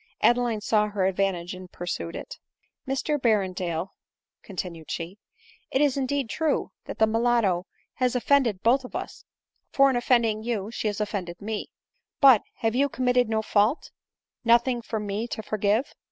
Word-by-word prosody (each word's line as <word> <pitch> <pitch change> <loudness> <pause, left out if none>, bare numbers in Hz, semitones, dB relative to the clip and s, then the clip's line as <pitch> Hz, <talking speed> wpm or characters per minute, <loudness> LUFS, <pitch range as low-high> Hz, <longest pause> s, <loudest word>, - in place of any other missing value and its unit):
Adeline 240 -3 +3
saw 210 0 +2
her 205 -2 -1
advantage, 190 -2 0
and 185 -1 -10
pursued 175 -1 -4
it. - - -8 0.2
" - - -45
Mr 280 +3 -1
Berrendale," 185 -6 0 0.5
continued 175 -4 -7
she, 175 +5 -5 0.3
" 460 - -25 0.2
it 265 - +2
is 285 -2 +3
indeed 275 -1 -1
true, 315 +6 -1
that - - -7
the 220 - +5
mulatto 220 -5 +1 0.3
has 255 -1 0
offended 250 -6 +2
both 255 +4 +4
of 250 - -10
us; - - -6 0.5
for 275 0 +5
in - - -1
offending 235 -3 +2
you 220 -3 -3
she 230 - -2
has 205 -1 -2
offended 190 -5 -3
me; 215 +1 -4 0.5
but, 270 -8 +8 0.2
have 225 -1 +1
you 280 +3 +2
committed 250 -2 +1
no 220 -1 0
fault, 215 +8 +1 0.5
nothing 240 +1 +3
for 225 -1 -4
me 210 +2 -3
to 220 - -5
forgive 215 +4 0
220 Hz, 165 wpm, -26 LUFS, 195-250 Hz, 0.5 s, but